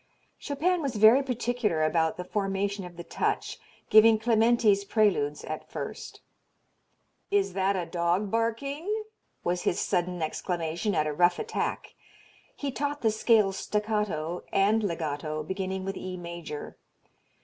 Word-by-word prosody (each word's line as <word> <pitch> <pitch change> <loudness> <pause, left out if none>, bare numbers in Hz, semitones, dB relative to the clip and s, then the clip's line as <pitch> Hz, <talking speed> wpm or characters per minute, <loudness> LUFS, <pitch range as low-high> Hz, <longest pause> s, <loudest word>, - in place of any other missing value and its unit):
Chopin 340 +5 0
was 275 -5 -2
very 220 +6 +7
particular 245 - -1
about 160 0 +1
the 180 - -4
formation 195 0 -2
of 175 -1 -11
the 170 - -6
touch, - - -2 0.3
giving 220 +1 +7
Clementi's 225 -2 +3
Preludes 195 -9 +1
at 155 - -6
first. - - -7 1.1
"Is 400 -1 +1
that 195 +1 +1
a 180 -2 -2
dog 175 +4 0
barking?" 280 - -1 0.4
was 175 +1 0
his - - 0
sudden 180 -2 -1
exclamation 170 +4 -2
at 155 - +2
a 150 - -1
rough 175 +3 +3
attack. - - -3 0.6
He 285 -1 -3
taught 290 +2 -3
the 220 - +3
scales 215 -3 +3
staccato 210 -6 -1
and 205 +3 +3
legato 155 -4 -3
beginning 190 +2 -3
with 195 0 -3
E 185 -1 -6
major. 170 -4 -7
195 Hz, 135 wpm, -28 LUFS, 175-225 Hz, 1.1 s, very